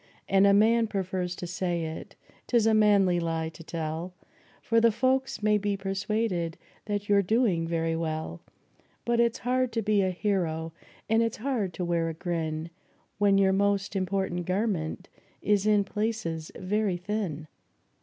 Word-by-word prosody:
And 195 +1 +5
a - - +6
man 225 +2 +4
prefers 185 -3 -2
to 180 - -6
say 175 -1 -2
it 160 0 -7 0.3
'tis 235 -3 +3
a 225 - +4
manly 200 -4 +4
lie 165 -1 -2
to 165 +1 -12
tell, 165 +2 -4 0.5
For 230 0 +3
the 230 0 +5
folks 260 +1 0
may 210 0 +3
be 205 0 -1
persuaded 195 -3 -2 0.3
that 205 -1 -3
you're 200 -1 +4
doing 200 -5 +1
very 165 -1 0
well; 155 - -3 0.6
But 235 0 +1
it's 235 -1 +2
hard 255 0 0
to 225 -1 -1
be 210 -1 +3
a 190 - +1
hero, 170 -4 -1 0.3
and 225 +1 +3
it's 230 -1 -1
hard 225 -6 -1
to 180 - -2
wear 170 -1 0
a 165 - -5
grin, 165 -1 -3 0.5
When 200 -1 +4
your 190 -1 +4
most 200 0 +1
important 185 -2 -1
garment 185 -3 -1 0.4
is 205 0 +2
in 210 -1 +4
places 200 -6 -3
very 200 0 0
thin. 180 -5 -3
195 Hz, 160 wpm, -28 LUFS, 170-215 Hz, 0.6 s, a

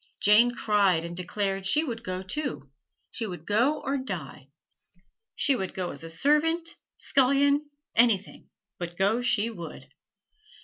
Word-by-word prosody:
Jane 235 +4 +5
cried 195 -8 +2
and 170 0 -6
declared 195 +1 -2
she 300 +10 +2
would 235 -6 -5
go, 185 -1 -4
too 170 - -4 0.4
she 225 - -3
would 175 -4 -8
go 240 +9 +2
or 275 +1 -1
die: 160 - -6 0.9
she 280 - +2
would 190 -6 -4
go 185 -2 -2
as 165 +3 -6
servant, 325 +4 +2 0.2
scullion 280 +2 +3 0.3
anything, 225 -4 +2 0.3
but 175 0 -6
go 205 +5 +2
she 230 -2 +1
would. 170 -7 -9
210 Hz, 135 wpm, -27 LUFS, 180-265 Hz, 0.9 s, Jane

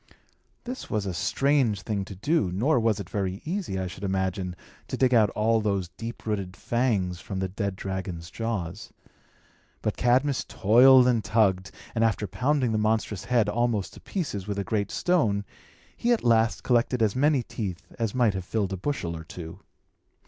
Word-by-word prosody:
This 255 +1 -6
was 105 -2 -1
a 95 - -2
strange 130 - +1
thing 100 -3 -2
to 100 - -9
do; 105 - +1
nor 125 - +2
was 110 -3 +1
it 100 - -6
very 95 -1 -2
easy, 175 - -2
I 95 - -2
should 90 +2 -8
imagine, 95 -1 -1 0.3
to - - -4
dig 130 -1 +3
out 110 -4 +5
all 110 +1 +2
those 100 -4 -1
deep 115 +6 -8
rooted 100 -4 -3
fangs 105 -8 0
from 95 - -6
the 95 0 -1
dead 100 +1 -3
dragon's 95 -3 -5
jaws. 105 -5 -4 0.9
But - - -1
Cadmus 130 +3 +2
toiled 125 +4 +6
and 120 -3 +2
tugged, 95 -4 +2 0.2
and 115 - +1
after 110 -2 +1
pounding 130 +2 0
the 110 - +1
monstrous 105 -2 0
head 115 -1 +2
almost 110 -2 0
to - - -12
pieces 120 - -4
with 100 -1 -3
a 100 - -1
great 105 -1 -1
stone, 110 - +1 0.5
he 240 - 0
at 235 - +2
last 115 -1 +3
collected 120 -1 +2
as 105 -2 +1
many 140 -1 +3
teeth 95 -7 -5
as 115 -1 -1
might 120 -5 +3
have 95 -1 -4
filled 100 0 -1
a - - -3
bushel 90 -7 -3
or 80 - -7
two. 80 0 -9
105 Hz, 180 wpm, -26 LUFS, 95-120 Hz, 0.9 s, toiled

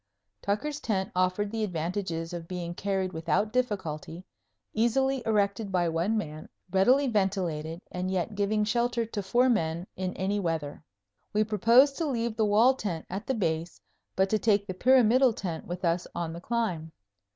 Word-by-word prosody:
Tucker's 285 +9 -2
tent 195 -3 -1
offered 185 +3 +1
the 225 -1 -2
advantages 170 -2 -3
of 170 -1 -6
being 175 -1 -4
carried 190 0 -2
without 170 +7 0
difficulty, 185 -8 -2 0.5
easily 265 +4 +2
erected 205 -1 +1
by 180 -2 +2
one 170 +7 0
man, 155 -6 -5 0.2
readily 250 +9 +4
ventilated 185 - -1
and 180 +1 -3
yet 190 +3 -1
giving 205 +1 +1
shelter 235 +2 0
to 215 -2 -4
four 240 +7 +3
men 170 -7 0
in 185 0 -3
any 200 +2 0
weather. 160 -5 -3 0.5
We 215 +1 +3
proposed 230 +6 +4
to 325 - 0
leave 235 -4 -1
the 220 - +2
wall 225 +6 +5
tent 185 -10 -4
at 200 +5 -5
the 265 - 0
Base, 165 -4 -2 0.4
but 190 +1 +3
to 215 - +3
take 205 -1 +2
the 190 - -4
pyramidal 250 +3 +5
tent 175 -6 -5
with 175 +1 -4
us 170 +1 0
on 165 -1 -3
the 170 - -8
climb. 180 -9 -2
200 Hz, 165 wpm, -28 LUFS, 175-225 Hz, 0.5 s, wall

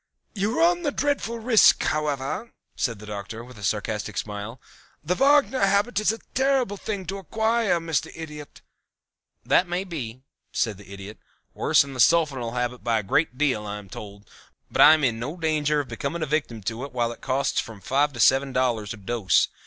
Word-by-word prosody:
"You 210 +3 -1
run 345 +1 +3
a 295 - +1
dreadful 285 -5 -1
risk, 225 -1 +5
however," 150 - -2 0.2
said 115 -3 -1
the 105 - -11
Doctor, 105 +2 -6
with 125 -2 -13
a - - -10
sarcastic 105 0 -2
smile. 105 +4 -5 0.4
"The 165 +4 0
Wagner 275 +3 +4
habit 200 +4 +2
is 215 - +2
a 225 - -5 0.2
terrible 265 -5 +1
thing 200 -1 -5
to 195 +3 -4
acquire, 220 0 +1
Mr. 165 -1 -2
Idiot." 150 -2 -9 0.8
"That 180 - +3
may 175 +2 -2
be," 130 -9 -7 0.3
said 110 -5 -1
the 100 -1 -14
Idiot. 100 +2 -9 0.3
"Worse - - +3
than 140 -1 -9
the 130 - -8
sulfonal 135 -6 +3
habit 125 0 -3
by 115 -1 +1
a 110 - -2
great 130 +6 0
deal 130 -8 0
I 105 0 -4
am 100 -2 -11
told, 100 0 -10 0.4
but - - +2
I 155 - +9
am 155 - -3
in 115 -4 +1
no 145 +9 -5
danger 150 -2 +1
of 140 - -9
becoming 160 +4 -3
a - - 0
victim 140 -8 -2
to 115 +5 -3
it 140 - -7
while 120 -2 0
it 120 - -11
costs 135 +1 0
from 110 -3 -6
five 140 +9 +1
to 120 - -9
seven 135 +4 +4
dollars 120 -4 0
a - - -15
dose. 105 0 +1
140 Hz, 195 wpm, -25 LUFS, 115-185 Hz, 0.8 s, I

